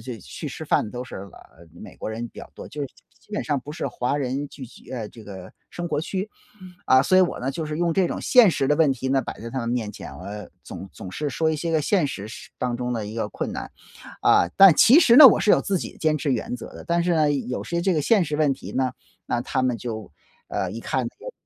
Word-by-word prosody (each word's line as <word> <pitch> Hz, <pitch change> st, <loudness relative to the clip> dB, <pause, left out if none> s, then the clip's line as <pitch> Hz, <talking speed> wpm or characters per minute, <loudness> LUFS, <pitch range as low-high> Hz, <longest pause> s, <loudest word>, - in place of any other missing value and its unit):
且 120 Hz, 0 st, -7 dB
去 -, -, -8 dB
吃 -, -, -7 dB
饭 105 Hz, -, +1 dB
都 125 Hz, +1 st, -6 dB
是， -, -, -9 dB
呃， 85 Hz, -3 st, -13 dB
美 -, -, -11 dB
国 -, -, -4 dB
人 115 Hz, +2 st, -4 dB
比 -, -, -15 dB
较 -, -, -12 dB
多， -, -, -9 dB
就 150 Hz, -, -8 dB
是 140 Hz, -, -1 dB
基 -, -, -22 dB, 0.3 s
基 -, -, -30 dB
本 -, -, -2 dB
上 145 Hz, -3 st, -1 dB
不 145 Hz, -, -10 dB
是 155 Hz, -, -4 dB
华 125 Hz, +4 st, -2 dB
人 140 Hz, +1 st, -2 dB
聚 135 Hz, -, -10 dB
集， 125 Hz, -, -15 dB
呃， 115 Hz, -5 st, -4 dB
这 115 Hz, -, -13 dB
个 95 Hz, -3 st, -10 dB, 0.2 s
生 175 Hz, 0 st, -5 dB
活 150 Hz, -3 st, -1 dB
区。 190 Hz, +4 st, -3 dB, 0.6 s
啊， 130 Hz, 0 st, +6 dB
所 185 Hz, -, +4 dB
以 -, -, +8 dB
我 180 Hz, -, +2 dB
呢， 135 Hz, -, -1 dB
就 155 Hz, +3 st, -4 dB
是 150 Hz, -, -4 dB
用 170 Hz, -1 st, +1 dB
这 185 Hz, -3 st, +2 dB
种 -, -, -4 dB
现 240 Hz, -6 st, +6 dB
实 135 Hz, -4 st, 0 dB
的 150 Hz, -, +4 dB
问 160 Hz, -3 st, +4 dB
题 130 Hz, +1 st, -4 dB
呢， 135 Hz, -1 st, +2 dB
摆 -, -, -7 dB
在 115 Hz, -, -6 dB
他 130 Hz, -, -3 dB
们 115 Hz, -, -3 dB
面 115 Hz, -3 st, -2 dB
前， -, -, -9 dB
我 105 Hz, +1 st, -8 dB
总 95 Hz, -, -8 dB
总 95 Hz, -, -9 dB
是 150 Hz, +5 st, -3 dB
说 160 Hz, +3 st, 0 dB
一 155 Hz, -, -1 dB
些 165 Hz, +2 st, -2 dB
个 155 Hz, -, +2 dB
现 170 Hz, -2 st, +2 dB
实 105 Hz, -5 st, -6 dB
实 -, -, -10 dB
当 120 Hz, -1 st, -2 dB
中 125 Hz, 0 st, -2 dB
的 110 Hz, -3 st, -3 dB
一 105 Hz, -, -7 dB
个 110 Hz, -2 st, -2 dB
困 -, -, -4 dB
难。 -, -, -6 dB, 0.5 s
啊， 85 Hz, -, +4 dB
但 195 Hz, -4 st, +9 dB
其 250 Hz, -, +7 dB
实 240 Hz, -4 st, +6 dB
呢， 290 Hz, -3 st, +13 dB
我 -, -, +5 dB
是 210 Hz, -, +4 dB
有 -, -, +4 dB
自 195 Hz, -2 st, 0 dB
己 -, -, -6 dB
的 -, -, -18 dB
坚 155 Hz, -1 st, +1 dB
持 140 Hz, 0 st, -1 dB
原 125 Hz, 0 st, -2 dB
则 120 Hz, -, -10 dB
的， -, -, -11 dB
但 170 Hz, 0 st, +1 dB
是 175 Hz, -, +1 dB
呢， 155 Hz, -2 st, +3 dB
有 125 Hz, -2 st, -3 dB
些 170 Hz, 0 st, -2 dB
这 190 Hz, 0 st, +2 dB
个 155 Hz, -, +1 dB
现 200 Hz, +5 st, +3 dB
实 150 Hz, -1 st, -3 dB
问 150 Hz, -3 st, +3 dB
题 -, -, -10 dB
呢， 130 Hz, -1 st, 0 dB, 0.3 s
那 120 Hz, 0 st, -1 dB
他 130 Hz, +1 st, -1 dB
们 125 Hz, -2 st, 0 dB
就 110 Hz, -2 st, -6 dB, 0.4 s
呃， 95 Hz, -1 st, -2 dB
一 115 Hz, -, -6 dB
看 130 Hz, +1 st, -2 dB
那 -, -, -3 dB, 0.2 s
就 -, -, -5 dB
135 Hz, 300 characters per minute, -24 LUFS, 115-160 Hz, 0.6 s, 呢